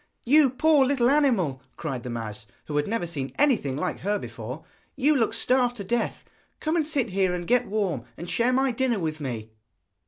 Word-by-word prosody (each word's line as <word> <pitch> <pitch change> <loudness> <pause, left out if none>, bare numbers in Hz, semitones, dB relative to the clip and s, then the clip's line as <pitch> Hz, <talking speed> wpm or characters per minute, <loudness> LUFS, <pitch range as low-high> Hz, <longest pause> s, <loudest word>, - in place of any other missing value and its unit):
'You 285 +2 +6
poor 290 +3 +4
little 260 -2 +3
animal,' 220 - +2 0.2
cried 135 -6 -4
the 125 - -7
mouse, 110 -3 -6 0.2
who 150 - -5
had 145 - +1
never 220 -4 -1
seen 145 -6 -5
anything 240 - +2
like - - -2
her 205 +2 0
before, 120 - -7 0.3
'you 285 +3 +3
look 230 -5 +2
starved 250 -1 +2
to 205 - -5
death! 235 +4 -2 0.3
Come 315 +2 -1
and 315 -3 +1
sit 275 -9 0
here 185 -1 +1
and 175 -1 -5
get 245 +5 +2
warm, 190 - -1
and 170 - -7
share 235 +7 +1
my 265 +1 +2
dinner 245 -1 0
with 155 -4 -3
me.' 115 -5 -5
210 Hz, 195 wpm, -26 LUFS, -, 0.3 s, You